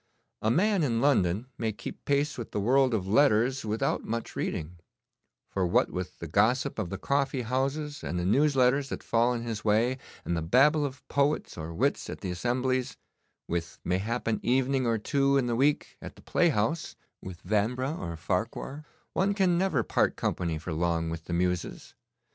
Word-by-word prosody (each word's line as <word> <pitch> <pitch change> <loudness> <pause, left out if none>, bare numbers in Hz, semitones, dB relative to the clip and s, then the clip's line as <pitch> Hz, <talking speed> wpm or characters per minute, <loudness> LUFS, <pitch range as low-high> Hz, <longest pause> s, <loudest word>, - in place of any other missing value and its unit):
A 110 - +1
man 190 - +3
in 120 -7 +1
London 110 -6 +2
may 110 -1 0
keep 105 - -9
pace 140 +1 +1
with 120 - -6
the - - -3
world 130 +3 +3
of 95 -3 -2
letters 125 +3 +3
without 110 0 -1
much 115 +1 -4
reading, 85 +3 -3 0.7
for 95 -2 0
what 85 - +2
with 90 0 -5
the - - -7
gossip 115 - +1
of 100 -5 -2
the 100 - -4
coffee 140 +2 0
houses 135 +5 -2
and 90 - -3
the 90 - -1
news 140 +9 +3
letters 135 +2 +3
that - - -5
fall 120 +1 +2
in 120 -1 -2
his 115 -2 -4
way, 115 +5 +2 0.3
and 85 - -1
the 85 - -1
babble 145 - +4
of 140 +1 -12
poets 140 +2 0
or 80 0 -6
wits 80 - 0
at - - -7
the 90 - -3
assemblies, 125 +6 -1 0.5
with 85 -1 -3
mayhap 105 +7 -1
an 115 - 0
evening 130 +1 +1
or 115 -1 +2
two 140 +5 +2
in 135 - +2
the 120 -1 0
week 145 +4 +1
at - - -9
the - - -17
playhouse, 155 -2 +1 0.3
with 90 -2 -9
Vanbrugh 120 - 0
or 85 -2 -5
Farquhar, 110 - -3 0.3
one 200 +1 +1
can 185 -3 +3
never 170 -9 +1
part - - +1
company 85 -3 -1
for 80 +2 -5
long 85 0 0
with 80 -1 -6
the 85 - -4
muses. 90 0 -2
115 Hz, 185 wpm, -28 LUFS, 90-140 Hz, 0.7 s, babble